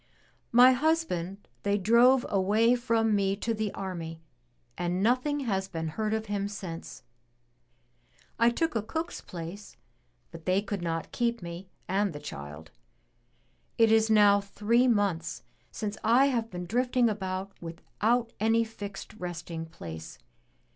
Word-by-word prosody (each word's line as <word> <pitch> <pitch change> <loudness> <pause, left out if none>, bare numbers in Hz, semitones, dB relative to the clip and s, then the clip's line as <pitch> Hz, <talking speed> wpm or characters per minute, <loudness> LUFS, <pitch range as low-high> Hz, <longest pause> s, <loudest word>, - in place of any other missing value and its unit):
*'My 245 +2 +8
husband 250 - 0
they 205 0 +1
drove 240 +6 +5
away 210 +5 +3
from 230 -3 +1
me 195 -1 +1
to 225 +3 -2
the 215 -2 -2
army 170 -4 -5 0.6
and 180 +2 -1
nothing 255 +5 +1
has 195 -7 -1
been 165 -4 -4
heard 215 +6 -2
of 220 0 -1
him 200 -1 -2
since. 190 -5 -7 1.4
I 230 +1 +6
took 320 +4 -1
a 225 - +1
cook's 320 +10 -4
place 175 +4 -8 0.5
but 165 -1 -11
they 185 +1 +3
could 200 -2 -4
not 165 -1 -3
keep 235 -4 -1
me 170 +2 -7 0.2
and 195 -1 +1
the 145 - -7
child. 75 - -9 1.1
It 225 -1 +5
is 220 0 +4
now 205 -2 +6
three 215 +5 +2
months 195 -8 0 0.3
since 210 0 -5
I 250 +5 +5
have 230 -2 -1
been 180 -2 -6
drifting 245 +4 +2
about 190 -2 -3
without 220 +8 -1
any 225 +2 +3
fixed 205 -3 -8
resting 170 -2 -5
place. 80 - -9
205 Hz, 140 wpm, -29 LUFS, 180-230 Hz, 1.4 s, My